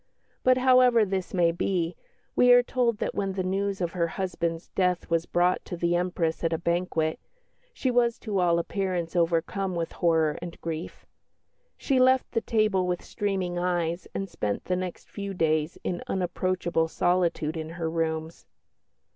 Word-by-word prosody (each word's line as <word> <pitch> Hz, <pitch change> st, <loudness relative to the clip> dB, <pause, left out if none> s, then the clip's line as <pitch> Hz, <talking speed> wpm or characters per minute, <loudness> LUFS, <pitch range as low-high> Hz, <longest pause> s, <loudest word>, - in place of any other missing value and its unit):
But, 255 Hz, 0 st, +4 dB
however 255 Hz, -3 st, +5 dB
this 190 Hz, -2 st, -3 dB
may 175 Hz, -2 st, +3 dB
be, 170 Hz, 0 st, -1 dB, 0.4 s
we 250 Hz, 0 st, +6 dB
are 245 Hz, 0 st, +7 dB
told 240 Hz, -3 st, 0 dB
that -, -, -2 dB
when 195 Hz, -1 st, -2 dB
the 190 Hz, -1 st, -2 dB
news 195 Hz, +1 st, -1 dB
of 170 Hz, -1 st, -1 dB
her 170 Hz, -1 st, 0 dB
husband's 170 Hz, -2 st, -3 dB
death 180 Hz, -2 st, 0 dB
was 165 Hz, 0 st, +1 dB
brought 175 Hz, +1 st, +2 dB
to 175 Hz, -, -6 dB
the 170 Hz, 0 st, +1 dB
Empress 175 Hz, -2 st, -1 dB
at 165 Hz, -, +1 dB
a 165 Hz, -, +1 dB
banquet, 170 Hz, -2 st, -1 dB, 0.5 s
she 265 Hz, -, -1 dB
was 240 Hz, -1 st, +2 dB
to 210 Hz, -4 st, -1 dB
all 170 Hz, -2 st, +3 dB
appearance 180 Hz, -1 st, -2 dB
overcome 175 Hz, +3 st, 0 dB
with 165 Hz, -1 st, -2 dB
horror 160 Hz, -3 st, +1 dB
and 175 Hz, -1 st, -8 dB
grief. 165 Hz, 0 st, -6 dB, 0.7 s
She 270 Hz, -3 st, +1 dB
left 260 Hz, 0 st, +4 dB
the 230 Hz, -, 0 dB
table 215 Hz, -5 st, +1 dB
with 180 Hz, -1 st, -2 dB
streaming 190 Hz, -4 st, -2 dB
eyes 175 Hz, -1 st, -1 dB
and 195 Hz, -, -2 dB
spent 105 Hz, -, -3 dB
the 180 Hz, -, 0 dB
next 185 Hz, -1 st, -5 dB
few 200 Hz, -1 st, -6 dB
days 155 Hz, -1 st, +1 dB
in 175 Hz, -, -2 dB
unapproachable 180 Hz, -2 st, 0 dB
solitude 170 Hz, -2 st, 0 dB
in 160 Hz, -1 st, -5 dB
her 165 Hz, -2 st, -2 dB
rooms. 160 Hz, 0 st, -3 dB
180 Hz, 165 wpm, -27 LUFS, 165-195 Hz, 0.7 s, are